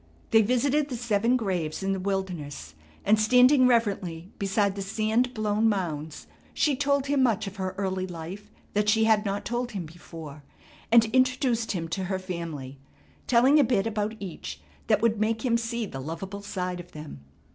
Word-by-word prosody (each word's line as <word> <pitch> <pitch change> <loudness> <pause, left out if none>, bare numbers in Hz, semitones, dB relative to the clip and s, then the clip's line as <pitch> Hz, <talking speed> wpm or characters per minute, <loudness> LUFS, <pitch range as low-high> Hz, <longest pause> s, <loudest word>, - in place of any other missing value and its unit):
They 225 - +7
visited 270 +6 +1
the 250 - -3
seven 230 +1 +2
graves 185 -7 -2
in 195 0 +1
the 190 - -2
wilderness, 180 - -4 0.3
and 215 +2 +4
standing 250 +4 +6
reverently 195 -7 0
beside 200 0 +1
the 200 - -4
sand 220 +5 0
blown 215 +1 +2
mounds 160 -7 -3 0.3
she 295 -3 +2
told 280 0 +1
him 280 -1 +1
much 225 -4 +2
of 195 +1 -7
her 185 -1 -3
early 190 -1 -2
life 180 +4 -8 0.2
that 210 0 +2
she 220 +1 +4
had 220 -1 +3
not 200 0 -2
told 240 +1 -2
him 190 -4 -4
before, 155 -2 -10 0.5
and 230 -1 +7
introduced 255 -3 +2
him 165 -3 -3
to 190 +2 -2
her 190 +1 -1
family, 165 -8 -6 0.5
telling 255 +5 +5
a - - +6
bit 225 -5 +1
about 215 0 -2
each 190 -4 -7 0.3
that - - +2
would 225 -2 +2
make 220 +2 0
him 235 -2 +3
see 235 0 -2
the 135 -9 -7
loveable 185 +7 -6
side 180 -3 -4
of 175 0 -11
them. 150 - -9
205 Hz, 180 wpm, -27 LUFS, 180-235 Hz, 0.5 s, They